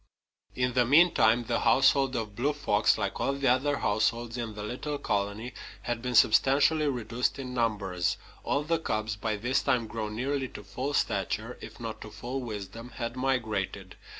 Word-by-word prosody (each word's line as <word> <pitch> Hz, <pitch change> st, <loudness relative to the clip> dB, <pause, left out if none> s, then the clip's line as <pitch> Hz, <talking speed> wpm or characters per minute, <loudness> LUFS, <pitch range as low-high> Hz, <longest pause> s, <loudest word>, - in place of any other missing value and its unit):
In 125 Hz, 0 st, 0 dB
the 125 Hz, 0 st, +4 dB
meantime 125 Hz, -4 st, +5 dB
the -, -, -1 dB
household 135 Hz, -2 st, +4 dB
of 110 Hz, -3 st, -3 dB
Blue 140 Hz, +6 st, +1 dB
Fox, 145 Hz, 0 st, +2 dB
like -, -, -2 dB
all 135 Hz, -, +1 dB
the 140 Hz, -1 st, -1 dB
other 140 Hz, +3 st, +2 dB
households 115 Hz, +2 st, 0 dB
in 115 Hz, -3 st, -4 dB
the 105 Hz, -, -6 dB
little 135 Hz, +7 st, -4 dB
colony, 105 Hz, -1 st, -2 dB, 0.3 s
had 120 Hz, -1 st, -2 dB
been 125 Hz, 0 st, -2 dB
substantially 145 Hz, +7 st, +5 dB
reduced 125 Hz, -2 st, -1 dB
in 130 Hz, -2 st, -6 dB
numbers. 100 Hz, -7 st, 0 dB, 0.3 s
All 145 Hz, -, 0 dB
the 165 Hz, +2 st, 0 dB
cubs, 110 Hz, -8 st, -2 dB
by 105 Hz, +1 st, -2 dB
this 120 Hz, +6 st, 0 dB
time 120 Hz, -2 st, +1 dB
grown 110 Hz, -1 st, -4 dB
nearly 135 Hz, +3 st, -1 dB
to -, -, -10 dB
full 140 Hz, +3 st, -3 dB
stature, 110 Hz, +4 st, -1 dB
if -, -, -10 dB
not 115 Hz, -2 st, -6 dB
to 105 Hz, -, -8 dB
full 120 Hz, +5 st, -5 dB
wisdom, 115 Hz, +1 st, -7 dB
had 115 Hz, +1 st, -4 dB
migrated. 110 Hz, -7 st, -2 dB
120 Hz, 175 wpm, -29 LUFS, 110-135 Hz, 0.3 s, meantime